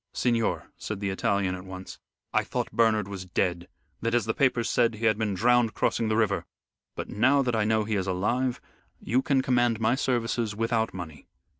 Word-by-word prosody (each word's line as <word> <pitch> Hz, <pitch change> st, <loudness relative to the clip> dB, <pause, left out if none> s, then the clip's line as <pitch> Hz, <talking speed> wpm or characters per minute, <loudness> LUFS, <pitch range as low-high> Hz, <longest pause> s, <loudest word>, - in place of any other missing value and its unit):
"Signor," 115 Hz, -2 st, 0 dB
said 105 Hz, -2 st, -5 dB
the 100 Hz, -1 st, -2 dB
Italian 95 Hz, -1 st, 0 dB
at 90 Hz, 0 st, -6 dB
once, 95 Hz, 0 st, -9 dB, 0.3 s
"I -, -, +3 dB
thought -, -, -3 dB
Bernard 110 Hz, -3 st, +2 dB
was 95 Hz, -2 st, -7 dB
dead; 90 Hz, -1 st, -1 dB, 0.3 s
that, 115 Hz, +1 st, 0 dB
as 120 Hz, -4 st, +2 dB
the 110 Hz, -, 0 dB
papers 125 Hz, -3 st, +1 dB
said, 115 Hz, -1 st, +2 dB
he 110 Hz, +2 st, -3 dB
had 110 Hz, -1 st, +4 dB
been 105 Hz, -2 st, -1 dB
drowned 120 Hz, +2 st, +3 dB
crossing 115 Hz, -, 0 dB
the 110 Hz, 0 st, +1 dB
river. 105 Hz, -3 st, +1 dB, 0.5 s
But -, -, -5 dB
now 130 Hz, +6 st, +3 dB
that 125 Hz, -2 st, 0 dB
I 110 Hz, -1 st, +1 dB
know 110 Hz, 0 st, +2 dB
he 105 Hz, 0 st, -1 dB
is 95 Hz, 0 st, -2 dB
alive, 120 Hz, +7 st, 0 dB, 0.4 s
you 125 Hz, +3 st, +1 dB
can 135 Hz, -1 st, +1 dB
command 120 Hz, -3 st, +2 dB
my 110 Hz, +1 st, +2 dB
services 120 Hz, -4 st, -1 dB
without 115 Hz, 0 st, 0 dB
money. 80 Hz, -5 st, -9 dB
110 Hz, 195 wpm, -27 LUFS, 100-120 Hz, 0.5 s, had